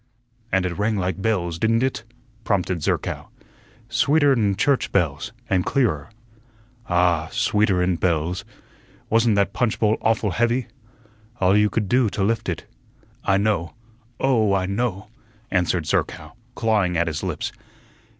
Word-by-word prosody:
"And 95 -1 +2
it 90 +1 -3
rang 105 +1 +1
like 95 -1 -2
bells, 85 -6 -1
didn't 115 +2 +2
it?" 130 -3 -1 0.4
prompted 90 -5 0
Zerkow. - - -2 0.6
"Sweeter'n 130 -4 +3
church 140 +5 +1
bells, 80 -5 0 0.2
and 95 -5 +1
clearer." 85 - 0 0.8
"Ah, 85 -3 +2
sweeter'n 95 -4 +1
bells. 85 0 0 0.7
Wasn't 115 -1 +4
that 100 -1 +1
punch 120 -4 0
bowl 110 0 +2
awful 110 -2 +1
heavy?" 120 +5 +1 0.7
"All 95 +1 +4
you 105 0 +4
could 105 -2 -1
do 120 +1 +3
to 100 - -2
lift 115 -1 0
it." 85 -4 -4 0.6
"I 95 - +3
know. 100 -5 0 0.4
Oh, 110 -7 +3
I 95 -1 0
know," 100 0 -2 0.4
answered 90 -3 +1
Zerkow, - - -1 0.2
clawing 105 -6 +1
at 85 - +2
his 80 -2 -3
lips. - - -3
100 Hz, 135 wpm, -23 LUFS, 90-115 Hz, 0.8 s, Wasn't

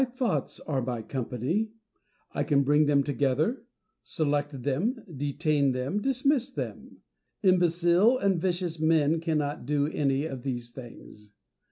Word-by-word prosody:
Diogenes. 255 -1 -2
My 255 - +2
thoughts - - -2
are 140 -4 -2
my 120 -2 -3
company; 130 - -2 0.6
I 145 - 0
can 140 -1 +2
bring 145 +2 +3
them 140 -1 +3
together, 145 - 0 0.4
select 145 -4 -2
them, 200 - -1
detain 145 0 +1
them, 130 +11 -2
dismiss 270 +1 +1
them. 265 - -7 0.4
Imbecile 180 +4 +4
and 195 -7 +1
vicious 175 -3 -1
men 160 0 +3
cannot 150 -5 -2
do 145 -1 +1
any 140 -1 0
of 135 -5 -5
these 120 -2 -4
things. 115 -4 -12
150 Hz, 140 wpm, -28 LUFS, 135-185 Hz, 0.6 s, Imbecile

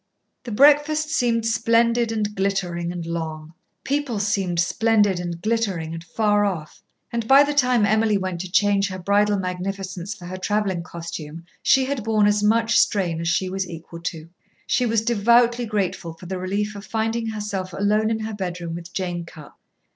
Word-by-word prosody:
The 240 - -5
breakfast 295 +5 +4
seemed 235 -7 +1
splendid 230 +1 +2
and 210 -2 -2
glittering 185 -3 -1
and 175 -2 -5
long; 160 -1 -5 0.3
people 280 -5 -1
seemed 195 -4 0
splendid 205 +1 +2
and 175 -1 -4
glittering 195 -6 -1
and 165 0 -7
far 205 +3 +1
off; 175 -7 -3 0.3
and 230 -1 -2
by 275 +3 +8
the 290 0 -1
time 250 -6 +3
Emily 215 0 +2
went 185 -3 -3
to 185 -1 -7
change 200 0 +3
her 185 - -5
bridal 205 +3 +2
magnificence 185 0 -4
for 180 - -12
her 185 +1 -6
travelling 195 -2 -1
costume 165 -2 -8 0.2
she 265 -1 +4
had 270 -4 -3
borne 215 -1 +2
as 205 0 +3
much 225 +2 +3
strain 175 -5 +1
as 170 - -3
she 175 +2 +1
was 190 0 -3
equal 170 0 -9
to. 165 -2 -5 0.4
She 250 - +1
was 225 -1 +1
devoutly 235 +1 +3
grateful 190 -5 -2
for 180 - -13
the 185 +1 -4
relief 205 +3 -2
of 200 - -8
finding 225 +1 -2
herself 205 -4 -4
alone 210 +4 +1
in 220 0 -1
her 220 0 -4
bedroom 175 -4 -4
with 170 +1 -8
Jane 175 -2 -3
Cupp. 155 -3 -13
200 Hz, 175 wpm, -23 LUFS, 175-225 Hz, 0.4 s, by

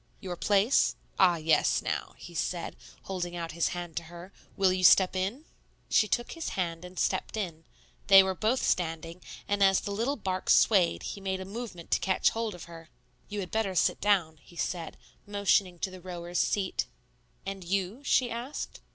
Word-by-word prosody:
"Your 180 -2 -5
place? 205 +7 +3 0.2
Ah, 180 -2 +6
yes; 160 0 +3
now," - - -3
he - - -11
said, - - -3 0.3
holding 175 -2 -4
out 165 -1 -4
his 170 +1 0
hand 175 -2 -5
to - - -3
her, 175 +3 -11 0.2
"will 190 -2 +4
you 185 0 -2
step 185 +1 +6
in?" 200 +11 -2 0.4
She 215 - +4
took 240 +3 -1
his 330 -1 -4
hand 170 -2 -2
and 180 0 -11
stepped 190 +5 -1
in; 165 -6 -4 0.4
they 195 -1 +9
were 190 0 -1
both 220 +7 0
standing, 165 0 -1 0.3
and 205 0 0
as 195 -1 +5
the 200 - -5
little 230 +8 -1
bark 185 -6 -3
swayed 190 -6 +4
he 200 - -6
made 190 -1 -2
a 190 - -6
movement 200 -4 -8
to - - +3
catch 190 -1 +2
hold 225 -3 -3
of 175 - -10
her. 165 -1 -12 0.4
"You 205 -1 -3
had 180 - -7
better 215 -4 -1
sit - - +2
down," 185 -6 +2
he 175 - -18
said, 170 -1 -3 0.3
motioning 200 -3 +2
to 190 - -3
the 185 -1 -11
rower's 175 -1 -4
seat. 195 -3 0 0.6
"And 195 -1 -5
you?" 195 +6 -2
she 250 -3 +2
asked. 240 +5 -5
190 Hz, 185 wpm, -29 LUFS, 175-205 Hz, 0.6 s, they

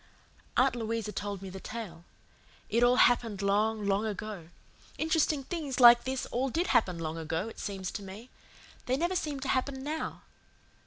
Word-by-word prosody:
Aunt - - +4
Louisa 225 -2 -3
told 205 -2 -4
me 190 - -7
the 190 - -7
tale. 190 -7 -7 0.7
It 235 - +2
all 245 +1 +5
happened 230 -5 +3
long, 210 +2 +1
long 200 +1 +1
ago. 205 -5 -6 0.5
Interesting 315 -3 +1
things 290 -4 -4
like 240 -1 +8
this 260 0 -2
all 260 +3 0
did 335 +7 0
happen 180 -6 +3
long 165 0 -4
ago, 165 +5 -2
it - - -12
seems 195 -2 -4
to 210 - -5
me. 200 +5 -10 0.6
They 255 +1 +1
never 345 +5 0
seem 300 -5 -2
to 265 - -4
happen 265 0 -1
now. 310 +2 -4
225 Hz, 170 wpm, -30 LUFS, 200-265 Hz, 0.7 s, like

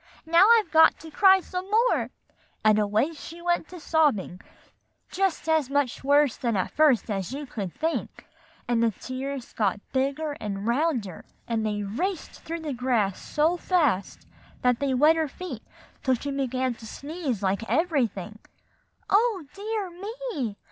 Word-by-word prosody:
Now 335 +4 +6
I've 420 -7 -1
got 320 0 +6
to 320 - -10
cry 385 +2 +6
some 365 +2 -6
more;' 460 +4 +2 0.6
and 215 0 +5
away 215 +9 +1
she 325 +2 -10
went 345 -2 0
to 360 - -10
sobbing, 290 - +1 0.7
just 380 -4 -1
as 315 -4 +2
much 280 -3 0
worse 285 -2 +3
than 235 -4 -1
at 185 - -1
first 270 -8 +3
as 195 0 -3
you 285 +2 -5
could 200 -8 -5
think; 325 +1 -3 0.4
and 235 -1 +1
the 230 - +4
tears 260 +4 -6
got 205 -2 0
bigger 275 +3 0
and 200 -1 -4
rounder, 235 - -1 0.2
and 225 -2 -1
they 210 -1 -1
raced 335 - -3
through 330 +1 -5
the 300 -3 -3
grass 235 -6 0
so 320 +4 +1
fast 300 - 0 0.4
that 250 -1 +3
they 275 -2 0
wet 305 +5 +5
her 320 -1 +1
feet 365 +6 -7 0.4
till 260 -1 +2
she 280 +4 -5
began 260 -2 -1
to 225 -1 -12
sneeze 280 - -4
like 195 +2 +1
everything." 235 - 0 0.7
"Oh, 405 -5 +2
dear 410 -2 -4
me!" 395 - -5
280 Hz, 155 wpm, -26 LUFS, 230-335 Hz, 0.7 s, Now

